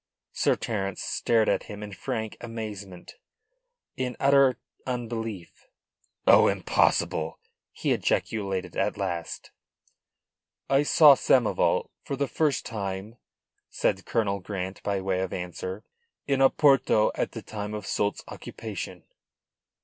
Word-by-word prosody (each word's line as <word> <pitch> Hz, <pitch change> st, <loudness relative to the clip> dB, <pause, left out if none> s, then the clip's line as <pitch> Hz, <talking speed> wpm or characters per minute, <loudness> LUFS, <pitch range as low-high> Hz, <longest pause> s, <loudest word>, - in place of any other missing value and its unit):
Sir -, -, +2 dB
Terence 100 Hz, -4 st, -3 dB
stared 115 Hz, -2 st, +1 dB
at -, -, +1 dB
him 105 Hz, 0 st, -7 dB
in 105 Hz, -1 st, -7 dB
frank 110 Hz, +4 st, -4 dB
amazement, 105 Hz, -6 st, -7 dB, 0.8 s
in 125 Hz, -2 st, -3 dB
utter 135 Hz, -3 st, +5 dB, 0.3 s
unbelief. 115 Hz, -6 st, -5 dB, 0.6 s
"Oh, -, -, +7 dB
impossible!" -, -, +1 dB, 0.3 s
he -, -, -2 dB
ejaculated 95 Hz, -3 st, -1 dB
at -, -, 0 dB
last. 90 Hz, -4 st, -4 dB, 1.2 s
"I 135 Hz, +1 st, +4 dB
saw 150 Hz, 0 st, +8 dB
Samoval 125 Hz, -3 st, +2 dB
for 140 Hz, -, -3 dB
the 140 Hz, +1 st, -1 dB
first 150 Hz, -3 st, 0 dB
time," 100 Hz, +1 st, -5 dB, 0.5 s
said 95 Hz, -, -1 dB
Colonel 100 Hz, -4 st, 0 dB
Grant 95 Hz, 0 st, -5 dB
by 100 Hz, -2 st, -1 dB
way 95 Hz, -1 st, 0 dB
of 95 Hz, -1 st, -2 dB
answer, 90 Hz, +3 st, -5 dB, 0.4 s
"in 135 Hz, -1 st, +1 dB
Oporto 135 Hz, -5 st, +4 dB
at -, -, -2 dB
the -, -, -7 dB
time 105 Hz, 0 st, -5 dB
of 105 Hz, -, -6 dB
Soult's 105 Hz, 0 st, -1 dB
occupation. -, -, -7 dB
105 Hz, 120 wpm, -27 LUFS, 95-125 Hz, 1.2 s, saw